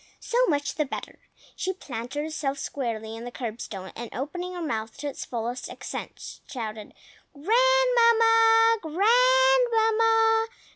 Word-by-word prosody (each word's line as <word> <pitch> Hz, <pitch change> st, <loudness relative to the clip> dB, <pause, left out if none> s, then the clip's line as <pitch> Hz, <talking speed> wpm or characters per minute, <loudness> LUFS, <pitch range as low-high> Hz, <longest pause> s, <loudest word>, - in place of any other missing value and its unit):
So -, -, 0 dB
much 285 Hz, -5 st, 0 dB
the 300 Hz, -, -1 dB
better! 270 Hz, -, -8 dB, 0.4 s
She 375 Hz, -, -2 dB
planted 265 Hz, -4 st, -6 dB
herself 300 Hz, -3 st, -3 dB
squarely 225 Hz, -5 st, -4 dB
on 225 Hz, -, -8 dB
the 245 Hz, -, -6 dB
curbstone, 215 Hz, -6 st, -6 dB
and 235 Hz, 0 st, -7 dB
opening 355 Hz, +7 st, -5 dB
her 350 Hz, -, -5 dB
mouth 225 Hz, -6 st, -4 dB
to 295 Hz, -, -5 dB
its 280 Hz, -, -6 dB
fullest 240 Hz, +1 st, -4 dB
extent, -, -, -8 dB
shouted, 220 Hz, -5 st, -7 dB, 0.4 s
"Grandmamma! 455 Hz, +2 st, +4 dB
Grandmamma! 450 Hz, +2 st, +3 dB
325 Hz, 125 wpm, -26 LUFS, -, 0.4 s, Grandmamma